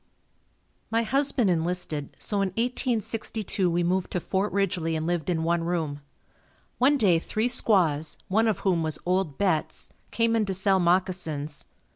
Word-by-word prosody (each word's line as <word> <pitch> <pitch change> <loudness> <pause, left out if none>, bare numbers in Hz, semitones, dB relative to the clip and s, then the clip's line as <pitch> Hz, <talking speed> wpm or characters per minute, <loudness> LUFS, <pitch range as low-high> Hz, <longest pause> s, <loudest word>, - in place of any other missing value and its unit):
My 230 +1 +1
husband 265 -3 +2
enlisted, 165 -3 -2
so 205 - -1
in 195 - +1
1862 225 -5 -1
we 175 +1 0
moved 180 +1 0
to 180 - 0
Fort 190 +4 -1
Ridgely 175 -5 0
and 160 0 -2
lived 175 0 -1
in 165 -2 0
one 170 0 +1
room. 160 -4 -2 0.8
One 280 +4 +4
day 190 -9 +3
three 215 +7 -1
squaws, 175 - +2
one 220 +4 +2
of 220 - 0
whom 180 -4 +1
was 155 -1 -1
old 180 -5 0
Betts, 185 -6 -1 0.2
came 230 0 +1
in 220 -2 +2
to 190 - -1
sell 190 0 +2
moccasins. 170 -5 -1
185 Hz, 155 wpm, -26 LUFS, 165-215 Hz, 0.8 s, One